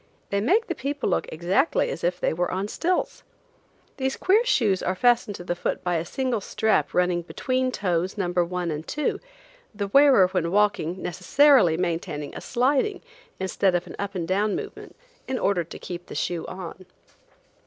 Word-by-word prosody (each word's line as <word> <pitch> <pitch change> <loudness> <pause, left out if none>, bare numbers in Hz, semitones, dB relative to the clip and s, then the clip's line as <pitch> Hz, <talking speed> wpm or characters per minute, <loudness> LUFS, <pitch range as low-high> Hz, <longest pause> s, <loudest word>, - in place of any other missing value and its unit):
They 200 0 +1
make 400 - +3
the 345 - -2
people 285 -1 -3
look - - 0
exactly 190 - +1
as - - -6
if 180 +1 0
they - - 0
were 175 +2 -1
on 190 +2 -2
stilts. 355 +11 -1 0.8
These 265 -1 -1
queer 415 +5 +3
shoes 215 - +2
are 185 - -1
fastened 240 -1 +2
to 175 - -8
the 175 - -1
foot 175 - -3
by 180 -1 0
a 165 - -3
single 255 +2 -2
strap 220 +2 0
running 180 -1 +2
between 255 +8 -1
toes 185 -2 -1
number 175 -2 +1
one 175 -1 -3
and 155 +1 -5
two, 300 0 -1 0.6
the 200 -1 -3
wearer 275 -5 +6
when 180 -3 -1
walking 190 -3 +1
necessarily 215 - +4
maintaining 165 -4 -3
a - - -7
sliding 280 - 0 0.4
instead 190 0 +1
of 175 0 -1
an - - -9
up 200 0 -4
and 170 -3 -2
down 200 +2 +1
movement, - - -7 0.3
in 260 - -1
order 195 -6 +1
to 165 - -10
keep 175 -1 -8
the - - -8
shoe 175 -2 -2
on. 185 0 -8
190 Hz, 180 wpm, -25 LUFS, 175-255 Hz, 0.8 s, wearer